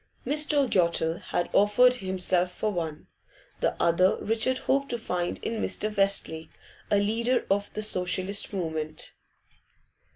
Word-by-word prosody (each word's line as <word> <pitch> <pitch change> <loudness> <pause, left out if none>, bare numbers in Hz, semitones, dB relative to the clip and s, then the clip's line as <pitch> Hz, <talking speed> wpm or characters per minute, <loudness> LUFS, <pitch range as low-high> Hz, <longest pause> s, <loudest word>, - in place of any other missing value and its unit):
Mr. 295 -1 +2
Yottle 170 -4 +1
had 175 - -2
offered 210 +5 +5
himself 185 -4 0
for 215 +4 -2
one; 160 -5 -4 0.5
the - - 0
other 170 +3 +3
Richard 225 +4 0
hoped 275 +1 0
to 240 - 0
find 180 -6 -2
in 225 -1 -2
Mr. 215 0 -2
Westlake, 195 -5 0 0.4
a 205 - +3
leader 230 +5 +1
of 200 +1 0
the 215 - -2
Socialist 185 0 0
movement. 160 -5 -4
200 Hz, 130 wpm, -27 LUFS, 175-225 Hz, 0.5 s, offered